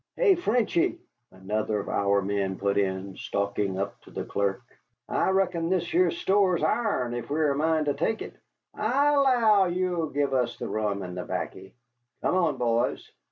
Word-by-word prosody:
"Hey, 435 Hz, -6 st, +5 dB
Frenchy," 240 Hz, -, +1 dB, 0.3 s
another 105 Hz, +3 st, -2 dB
of -, -, -6 dB
our 100 Hz, 0 st, +1 dB
men 100 Hz, -1 st, -1 dB
put 100 Hz, 0 st, 0 dB
in, 95 Hz, -1 st, -2 dB
stalking 100 Hz, -1 st, -2 dB
up 100 Hz, +1 st, -4 dB
to -, -, -17 dB
the -, -, -5 dB
clerk, 100 Hz, -1 st, -1 dB, 0.4 s
"I -, -, +1 dB
reckon 180 Hz, -3 st, +1 dB
this 180 Hz, -2 st, 0 dB
here 180 Hz, 0 st, +4 dB
store's 185 Hz, 0 st, +1 dB
ourn, 155 Hz, -, 0 dB
ef 120 Hz, +2 st, -5 dB
we've 150 Hz, +1 st, +1 dB
a -, -, +2 dB
mind 155 Hz, +2 st, +1 dB
to 145 Hz, -, +1 dB
tek 170 Hz, +10 st, -1 dB
it. -, -, -9 dB, 0.4 s
I 280 Hz, +7 st, +2 dB
'low 235 Hz, -8 st, +4 dB
you'll 175 Hz, -2 st, -1 dB
give 140 Hz, -1 st, -1 dB
us 125 Hz, -2 st, 0 dB
the -, -, -5 dB
rum 105 Hz, -2 st, -1 dB
and 90 Hz, -1 st, -7 dB
the 90 Hz, -, -4 dB
'baccy. 95 Hz, +3 st, -5 dB, 0.5 s
Come -, -, +1 dB
on, 170 Hz, -7 st, +1 dB
boys!" 120 Hz, 0 st, 0 dB
145 Hz, 175 wpm, -27 LUFS, -, 0.5 s, Hey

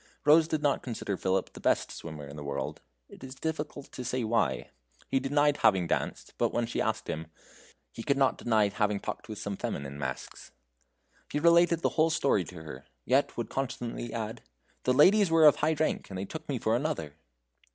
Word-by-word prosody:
Rose 155 Hz, +2 st, +6 dB
did 155 Hz, -2 st, -2 dB
not 145 Hz, -2 st, +2 dB
consider 110 Hz, -5 st, -3 dB
Philip 95 Hz, +1 st, -1 dB
the -, -, -10 dB
best -, -, +1 dB
swimmer 80 Hz, -3 st, -8 dB
in 70 Hz, -, -10 dB
the 75 Hz, -, -7 dB
world 70 Hz, -1 st, -4 dB, 0.3 s
it -, -, -14 dB
is 130 Hz, 0 st, -8 dB
difficult 150 Hz, -1 st, -4 dB
to 125 Hz, -, -6 dB
say 125 Hz, +1 st, -1 dB
why. 115 Hz, +1 st, 0 dB, 0.4 s
He 135 Hz, -, +2 dB
denied 145 Hz, +2 st, +2 dB
having 95 Hz, -6 st, +4 dB
danced, -, -, -2 dB
but -, -, +2 dB
when 120 Hz, 0 st, 0 dB
she 115 Hz, -, -2 dB
asked 110 Hz, 0 st, -1 dB
him, 80 Hz, +1 st, -4 dB, 0.6 s
he -, -, -8 dB
could 140 Hz, +4 st, +1 dB
not 135 Hz, -1 st, +2 dB
deny 110 Hz, -3 st, +2 dB
having 105 Hz, 0 st, 0 dB
talked -, -, -6 dB
with 105 Hz, -, -5 dB
some 100 Hz, -1 st, -4 dB
feminine 70 Hz, 0 st, -4 dB
masks. 65 Hz, -2 st, -6 dB, 0.8 s
He 150 Hz, -, 0 dB
related 170 Hz, +1 st, +5 dB
the -, -, +2 dB
whole 160 Hz, 0 st, +2 dB
story 140 Hz, -, +2 dB
to 80 Hz, -2 st, -10 dB
her, 70 Hz, -3 st, -10 dB, 0.2 s
yet -, -, +2 dB
would -, -, -3 dB
constantly 120 Hz, -3 st, -3 dB
add: 110 Hz, 0 st, -4 dB, 0.4 s
"The 125 Hz, -, +3 dB
ladies 195 Hz, +7 st, +6 dB
were 165 Hz, -1 st, +5 dB
of 150 Hz, -, +8 dB
high 155 Hz, +2 st, +2 dB
rank, 155 Hz, 0 st, -1 dB
and 95 Hz, -, -6 dB
they 95 Hz, -, -3 dB
took 160 Hz, +10 st, -8 dB
me 135 Hz, -, 0 dB
for 110 Hz, -1 st, +1 dB
another." 125 Hz, -, -2 dB
120 Hz, 200 wpm, -29 LUFS, 95-150 Hz, 0.8 s, of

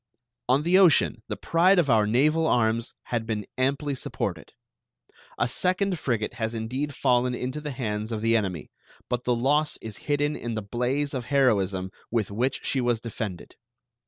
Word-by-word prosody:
On 135 Hz, +4 st, +4 dB
the 180 Hz, +3 st, +4 dB
ocean 160 Hz, -10 st, +4 dB
the 105 Hz, -, -4 dB
pride 175 Hz, -, +3 dB
of 170 Hz, -4 st, +3 dB
our 110 Hz, -5 st, +4 dB
naval 155 Hz, +8 st, +3 dB
arms 115 Hz, -2 st, +1 dB
had 115 Hz, -2 st, -3 dB
been 105 Hz, -3 st, -2 dB
amply 140 Hz, +3 st, 0 dB
supported. 130 Hz, -, -4 dB, 0.9 s
A 120 Hz, -, +1 dB
second 185 Hz, +6 st, 0 dB
frigate 115 Hz, -6 st, -1 dB
has 110 Hz, +1 st, -1 dB
indeed 130 Hz, +6 st, -3 dB
fallen 125 Hz, -1 st, +2 dB
into 130 Hz, +5 st, -4 dB
the 150 Hz, -, -4 dB
hands 110 Hz, -4 st, -3 dB
of 110 Hz, -1 st, -3 dB
the 115 Hz, 0 st, +3 dB
enemy, 95 Hz, -7 st, -2 dB, 0.4 s
but 125 Hz, 0 st, -2 dB
the 125 Hz, -, +2 dB
loss 145 Hz, +5 st, +1 dB
is 110 Hz, -2 st, -8 dB
hidden 145 Hz, +1 st, +1 dB
in 120 Hz, -1 st, -4 dB
the 110 Hz, -, -3 dB
blaze 125 Hz, +7 st, -1 dB
of 125 Hz, -3 st, -3 dB
heroism 100 Hz, -9 st, +1 dB, 0.2 s
with 110 Hz, -4 st, -1 dB
which 125 Hz, +6 st, -1 dB
she 135 Hz, -, +1 dB
was 120 Hz, -2 st, +1 dB
defended. 110 Hz, -5 st, -6 dB
125 Hz, 170 wpm, -26 LUFS, 110-145 Hz, 0.9 s, On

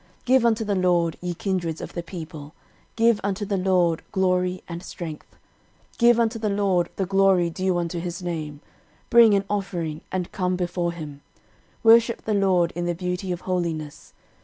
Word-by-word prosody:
13:016:028 -, -, -36 dB
Give 255 Hz, -1 st, +4 dB
unto 225 Hz, -1 st, +1 dB
the 205 Hz, -1 st, 0 dB
LORD, 175 Hz, -3 st, +1 dB
ye 175 Hz, 0 st, -3 dB
kindreds 170 Hz, -4 st, -2 dB
of -, -, -7 dB
the 170 Hz, -, -3 dB
people, 160 Hz, -3 st, -9 dB, 0.4 s
give 230 Hz, -1 st, +3 dB
unto 200 Hz, +1 st, -2 dB
the 200 Hz, 0 st, -1 dB
LORD 180 Hz, -3 st, +2 dB
glory 185 Hz, -1 st, 0 dB
and 170 Hz, 0 st, -6 dB
strength. 160 Hz, -4 st, -8 dB, 0.6 s
13:016:029 -, -, -27 dB
Give 235 Hz, 0 st, +5 dB
unto 225 Hz, 0 st, +1 dB
the 215 Hz, -1 st, -1 dB
LORD 195 Hz, -4 st, +1 dB
the 195 Hz, -, -1 dB
glory 195 Hz, -2 st, +3 dB
due 185 Hz, +1 st, 0 dB
unto 170 Hz, 0 st, -2 dB
his 175 Hz, +2 st, -5 dB
name: 155 Hz, -4 st, -5 dB, 0.5 s
bring 230 Hz, -3 st, +7 dB
an 200 Hz, 0 st, 0 dB
offering, 175 Hz, -6 st, -3 dB
and 185 Hz, -2 st, -3 dB
come 180 Hz, -1 st, -1 dB
before 175 Hz, -1 st, -2 dB
him: 150 Hz, -4 st, -8 dB, 0.6 s
worship 230 Hz, +1 st, +5 dB
the 220 Hz, -, 0 dB
LORD 185 Hz, -4 st, +2 dB
in 175 Hz, 0 st, -2 dB
the 175 Hz, 0 st, -1 dB
beauty 180 Hz, +1 st, -3 dB
of 175 Hz, 0 st, -4 dB
holiness. 165 Hz, -5 st, -4 dB
180 Hz, 180 wpm, -24 LUFS, 170-200 Hz, 0.6 s, bring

